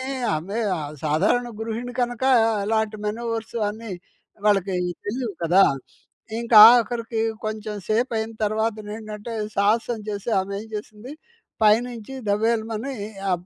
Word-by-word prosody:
కానీ, - - -5 0.3
ఆమె 195 +8 -4 0.2
ఆహ్, 150 -1 -5
సాధారణ 190 +11 +2
గృహిణి 230 +2 -4
కనకా, 245 +2 0 0.3
అలాంటి 220 0 0
మెనోవర్స్ 230 +1 -3
అన్ని 220 0 -8 0.5
వాళ్ళకయ్యి 185 -3 +1
తెలియవు 230 -2 -3
కదా! 180 +4 +5 0.8
ఇంకాఖరికీ, 230 0 +6 0.2
కొంచెం 215 0 -4
సేపయిన 225 0 0
తరవాతనేంటంటే, 215 0 -3 0.2
సాహసం 225 +3 +2
జేసి 205 +2 -3
ఆమేం 200 +2 -5
జేసింది, 215 +5 -7 0.5
పైనుంచి 230 +3 +2 0.2
దబేలుమని 225 +3 0 0.4
ఆ - - +3
220 Hz, 105 wpm, -23 LUFS, 210-235 Hz, 0.8 s, ఇంకాఖరికీ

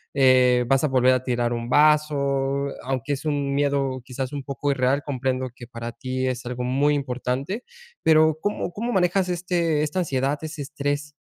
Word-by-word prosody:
eh, 125 -2 +5
vas 135 +3 +3
a - - +3
volver 130 -1 +4
a 130 0 0
tirar 120 -2 0
un 120 0 -4
vaso?, 140 -2 +2 0.2
aunque 135 +2 -2
es 140 - -5
un 145 -2 -1
miedo 140 -2 0
quizás 130 +1 -5
un 145 - -3
poco 140 +1 -2
irreal, 135 +1 +1
comprendo 130 -2 -2
que 120 - -11
para 115 -1 -6
ti 130 0 -3
es 125 -1 -2
algo 125 0 -4
muy 140 +4 +2
importante, 135 - -3 0.4
pero, 155 -1 +4
¿cómo 205 -3 -2
cómo 235 +5 -3
manejas 185 -2 +2
este, 170 -3 0
esta 155 +5 -2
ansiedad 140 -3 0
ese 155 -1 -6
estrés? 145 +1 -3
140 Hz, 175 wpm, -24 LUFS, 130-150 Hz, 0.4 s, eh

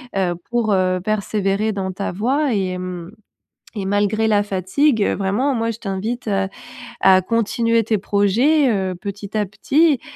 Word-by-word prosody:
heu, 185 -3 0
pour, 235 -3 +1
heu, 185 -1 +1
persévérer 210 0 0
dans 195 -2 -3
ta 195 +2 -4
voie 255 +8 0
et, 185 -3 -1
mmh, 180 -1 -6 0.6
et 200 -3 -3
malgré 205 +3 +1
la 205 -2 +3
fatigue, 205 - +1
vraiment 210 +8 0
moi 230 0 0
je 225 - -9
t'invite, 215 +5 -4
heu, 195 -2 0 0.5
à 185 -1 +5
continuer 230 +2 +1
tes 220 0 +1
projets, 235 +9 +2
heu, 190 -3 -1
petit 200 +2 -7
à 210 - 0
petit 285 - +2
205 Hz, 155 wpm, -20 LUFS, 190-230 Hz, 0.6 s, à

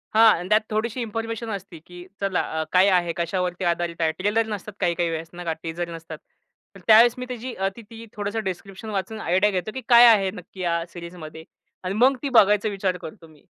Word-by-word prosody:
हां, 225 -3 +7
अन् 180 - -7
त्यात 215 +1 +4
थोडीशी 225 +3 -2
इन्फॉर्मेशन 225 0 -4
असती 180 -4 -7
की 175 0 -12 0.2
चला 195 -2 0 0.2
अ, - - 0
काय 185 +2 +5
आहे, 175 -2 +2
कशावरती 180 +1 -2
आधारित 170 0 -1
आहे. 160 - +2
ट्रेलर 210 +4 +1
नसतात 210 -1 -6
काही-काही 170 0 0
वेळेस 165 0 -5
नाही 175 0 -8
का 165 - 0
टीझर 170 +1 -4
नसतात. 165 0 -9 0.6
तर - - -12
त्यावेळेस 225 +2 +7
मी 250 - -5
त्याची 250 0 -6
अ, 195 +1 -1
ती 235 - -10
ती, 230 0 -10
थोडसं 205 +2 -3
डिस्क्रिप्शन 195 +3 -6
वाचून 205 +2 -4
आयडिया 190 +4 +2
घेतो 190 +3 -3
की 260 - -5
काय 240 0 +9
आहे 195 -4 +4
नक्की 180 +1 -11
या 170 -1 0
सीरीजमध्ये 170 -2 -10 0.4
आणि 185 +1 -2
मग 260 +4 +4
ती 280 - -1
बघायचा 210 -3 +4
विचार 195 -2 -2
करतो 165 -1 -11
मी. 155 -2 -21
190 Hz, 210 wpm, -24 LUFS, 175-220 Hz, 0.6 s, काय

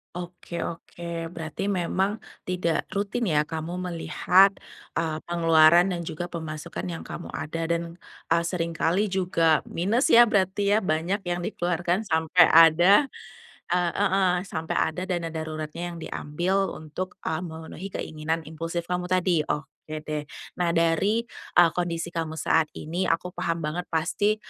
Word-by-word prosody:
Oke 175 -1 -6
oke. 170 0 -6
Berarti 165 +3 -5
memang 190 +1 0 0.3
tidak 180 -2 0
rutin, 205 +3 -1
ya, 150 -3 +3
kamu 160 +2 -5 0.2
melihat, 190 +3 +4 0.4
eee, 160 -1 -1
pengeluaran 170 +1 +5
dan 175 -1 -2
juga 175 +2 -5
pemasukan 160 +1 -5
yang 170 -2 -5
kamu 170 - -7
ada 165 +1 -3
dan, 170 +1 -2 0.3
eee, 170 +1 +4
sering 170 -1 -2
kali 185 +5 +1
juga 170 -4 +2
minus, 210 - +1
ya, 240 - +8
berarti, 200 -2 +1
ya, 215 - +4
banyak 180 +2 -1
yang 175 0 -1
dikeluarkan 175 +2 -1
sampai 160 +2 +5
ada 170 - +7 0.7
eee, 175 -1 +2
heeh, 195 -2 +3 0.2
sampai 160 -2 -3
ada 180 +3 0
dana 175 -3 -1
daruratnya 160 +2 -5
yang - - -8
diambil 175 +5 -1
untuk, 160 +4 -6
eee, 160 0 0
memenuhi 160 +2 -7
keinginan 160 0 -3
impulsif 165 +2 -4
kamu 180 0 -2
tadi. 185 -2 +2
Oke, 155 +1 -5
deh. 150 -1 -4 0.3
Nah 170 -1 +1
dari, 170 +7 +2 0.3
eee, 175 -2 +7
kondisi 170 -1 -2
kamu 165 -2 -3
saat 160 0 +2
ini, 175 +4 -2
aku 180 +2 0
paham 170 -2 -2
banget 160 +4 -3
pasti, 205 +6 +1
170 Hz, 145 wpm, -26 LUFS, 160-185 Hz, 0.7 s, ya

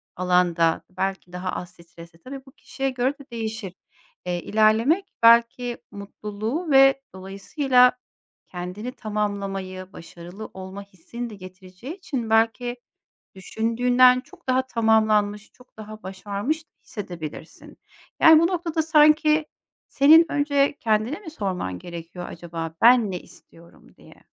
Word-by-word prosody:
alanda 180 -2 +2
belki 190 -1 -4
daha 180 +1 -4
az 175 - -6
stresli, 170 -1 -16
tabii, 265 +7 -10
bu 265 - -16
kişiye 270 +1 -4
göre 255 +1 -1
de 280 - -13
değişir. 220 -4 -5 0.5
Eee, 175 -1 -2
ilerlemek, 225 - +2 0.2
belki 235 +1 +4
mutluluğu 210 - -5
ve 270 0 +6
dolayısıyla 250 +7 +2 0.6
kendini 180 +7 -6
tamamlamayı, 195 -4 -4
başarılı 175 +5 -10
olma 190 +1 -8
hissini 200 +5 -8
de 215 - -10
getireceği 185 - -11
için 260 - -5
belki 225 +2 +1 0.6
düşündüğünden 245 +6 +3
çok 345 +2 -20
daha 255 0 +2
tamamlanmış, 215 -3 +1
çok 250 0 -23
daha 215 0 -10
başarmış 200 - -4 0.2
hissedebilirsin. 170 -6 -9 0.4
Yani, 320 -1 +8
bu 335 - +3
noktada 335 -3 -1
sanki 305 0 +4 0.4
senin 315 +4 +6
önce 285 -1 +1
kendine 220 - 0
mi 355 -6 -9
sorman 185 - -4
gerekiyor 170 - -9
acaba 165 -1 -7
"Ben 235 -3 +6
ne 180 -2 -5
istiyorum?" 170 +1 -19
diye. - - -19
215 Hz, 120 wpm, -23 LUFS, 185-255 Hz, 0.6 s, Yani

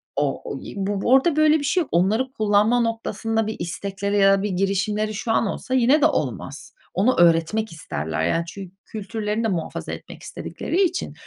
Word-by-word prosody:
o 145 -1 -1
o - - -4
y - - -9
bu 200 +2 -1
orada 270 +4 +5
böyle 310 0 +4
bir - - -5
şey 355 +6 +2
yok. 315 - -5
Onları 215 +10 +1
kullanma 215 0 +2
noktasında 225 -1 -1
bir 220 - -3
istekleri 200 +3 -3
ya 195 -1 +6
da - - -3
bir 210 - -1
girişimleri 200 +3 0
şu 225 +2 -3
an 225 - +2
olsa 255 - -4
yine 260 +4 +4
de - - +5
olmaz. 145 - -2 0.2
Onu 225 +8 +2
öğretmek 175 +6 +3
isterler 80 - -4
yani 165 - +1
çün 185 +1 -9
kültürlerini 215 +1 -3
de - - +2
muhafaza 175 -6 -3
etmek - - -9
istedikleri 360 - -3
için 360 0 -2
210 Hz, 185 wpm, -23 LUFS, 185-235 Hz, 0.2 s, ya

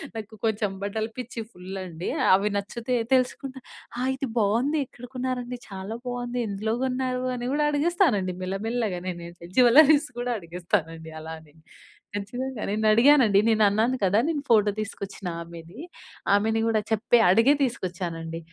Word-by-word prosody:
నాకు 220 -1 -7
కొంచెం 215 -2 0
బట్టలు 220 +2 -2
పిచ్చి 240 -1 -5
ఫుల్ 185 +1 -8
అండి, 170 0 -5 0.3
అవి 205 +2 0
నచ్చితే 230 +5 -3 0.2
తెలుసుకుంటా. 260 +1 -1 0.4
ఆ! - - -2
ఇది 265 -1 -4
బాగుంది, 235 +9 +2
ఎక్కడ 245 - -12
కొన్నారండి, 250 -1 -3
చాలా 195 +3 -6
బాగుంది, 245 0 -3
ఎందులో 215 +3 -1
కొన్నారు, 255 0 -1
అని 245 0 -4
కూడా 300 +1 +2
అడిగిస్తానండి 290 - +1
మెల్లమెల్లగా 200 0 -2
నేనైతే. 170 -1 -8
జ్యువెల్లరీస్ 290 +4 +6
గూడా 245 0 -1
అడిగిస్తానండి 165 -2 -3
అలానే. 160 -1 -10 0.6
ఖచ్చితంగా 245 +4 -4
నేను 215 +2 -1
అడిగానండి. 235 -3 +6
నేను 220 -1 +4
అన్నాను 220 +5 +2
కదా! 195 +3 +4
నేను 315 -3 -1
ఫోటో 210 -2 +5
తీసుకొచ్చిన 200 -2 -6
ఆమెని. 170 +2 -11 0.5
ఆమెని 220 +2 +2
గూడా 220 -1 +2
చెప్పే 220 +2 +3
అడిగే 230 +9 +5
తీసుకొచ్చానండి. 175 -9 -3
220 Hz, 135 wpm, -26 LUFS, 190-250 Hz, 0.6 s, జ్యువెల్లరీస్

